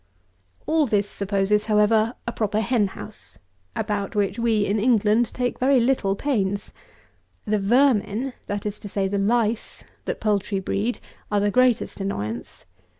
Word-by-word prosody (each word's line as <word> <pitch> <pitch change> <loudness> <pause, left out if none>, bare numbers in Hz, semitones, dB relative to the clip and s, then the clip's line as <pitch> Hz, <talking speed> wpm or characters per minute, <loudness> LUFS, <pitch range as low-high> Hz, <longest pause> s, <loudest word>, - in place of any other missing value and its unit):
All 310 -2 +2
this 205 -2 +1
supposes, 200 +1 0
however, 215 +2 +3
a 235 - -2
proper 215 -2 -1
hen 220 -2 +2
house, - - -10 0.4
about 210 -1 -2
which 200 +1 0
we, 225 -3 +2
in 210 +2 0
England, 225 0 +3
take 245 -1 -2
very 265 +1 +4
little 235 -5 +1
pains. 200 -6 -1 0.7
The 215 0 +1
vermin, 240 +2 +2
that 205 0 -3
is 210 0 -4
to 205 - -8
say, 195 -1 0
the 200 +1 -1
lice, 225 +2 0 0.2
that - - -3
poultry 205 -2 0
breed, 205 +5 -2 0.3
are 205 - +3
the 205 0 +1
greatest 250 -1 +2
annoyance. 115 - -5
210 Hz, 150 wpm, -24 LUFS, 200-235 Hz, 0.7 s, very